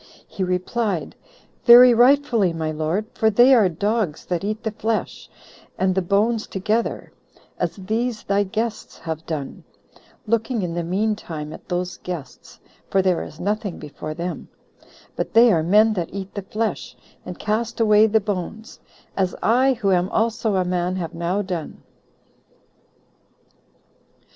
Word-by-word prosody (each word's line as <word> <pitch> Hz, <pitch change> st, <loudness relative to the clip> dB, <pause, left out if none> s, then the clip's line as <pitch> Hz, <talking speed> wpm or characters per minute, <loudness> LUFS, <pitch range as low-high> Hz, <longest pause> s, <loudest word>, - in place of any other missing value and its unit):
he 190 Hz, -, -4 dB
replied, 185 Hz, +1 st, -2 dB, 0.5 s
"Very 245 Hz, +1 st, +9 dB
rightfully, 240 Hz, -6 st, +4 dB
my 160 Hz, -1 st, -2 dB
lord; 160 Hz, +7 st, -1 dB
for 220 Hz, -, +2 dB
they 240 Hz, +5 st, +6 dB
are 215 Hz, -7 st, +5 dB
dogs 200 Hz, -1 st, -2 dB
that 175 Hz, 0 st, -2 dB
eat 215 Hz, +2 st, -3 dB
the 220 Hz, -, -2 dB
flesh 220 Hz, +1 st, -3 dB, 0.5 s
and 190 Hz, 0 st, +1 dB
the 190 Hz, -, +1 dB
bones 210 Hz, +5 st, +1 dB
together, 215 Hz, +4 st, -2 dB, 0.5 s
as -, -, -1 dB
these 220 Hz, +4 st, -2 dB
thy 200 Hz, +1 st, +1 dB
guests 215 Hz, +3 st, -3 dB
have 160 Hz, -1 st, -5 dB
done, 150 Hz, -4 st, -5 dB, 0.6 s
[looking 225 Hz, 0 st, 0 dB
in 170 Hz, -2 st, -3 dB
the 170 Hz, 0 st, -2 dB
mean 205 Hz, +6 st, 0 dB
time 155 Hz, -6 st, -7 dB
at -, -, -13 dB
those 180 Hz, 0 st, -2 dB
guests,] 170 Hz, -7 st, -8 dB, 0.3 s
for 190 Hz, -1 st, +2 dB
there 185 Hz, -2 st, +1 dB
is 155 Hz, -, -9 dB
nothing 205 Hz, -1 st, -2 dB
before 155 Hz, +1 st, -7 dB
them; 175 Hz, +2 st, -5 dB, 0.7 s
but -, -, -4 dB
they 230 Hz, -1 st, +7 dB
are 165 Hz, -, +2 dB
men 210 Hz, +7 st, +4 dB
that 175 Hz, -5 st, -3 dB
eat 195 Hz, 0 st, -7 dB
the 200 Hz, -, -4 dB
flesh, 215 Hz, +2 st, -4 dB, 0.3 s
and 180 Hz, -, -8 dB
cast 225 Hz, +2 st, -2 dB
away 215 Hz, -1 st, +5 dB
the 220 Hz, -1 st, +2 dB
hones, 215 Hz, +5 st, -8 dB, 0.4 s
as 190 Hz, -2 st, 0 dB
I, 255 Hz, +4 st, +4 dB
who 205 Hz, -5 st, 0 dB
am 180 Hz, 0 st, +2 dB
also 225 Hz, -1 st, 0 dB
a 185 Hz, -1 st, +1 dB
man, 180 Hz, 0 st, -1 dB
have 175 Hz, -3 st, -4 dB
now 175 Hz, +4 st, -1 dB
done." 180 Hz, -5 st, -6 dB
200 Hz, 150 wpm, -22 LUFS, 180-225 Hz, 0.7 s, Very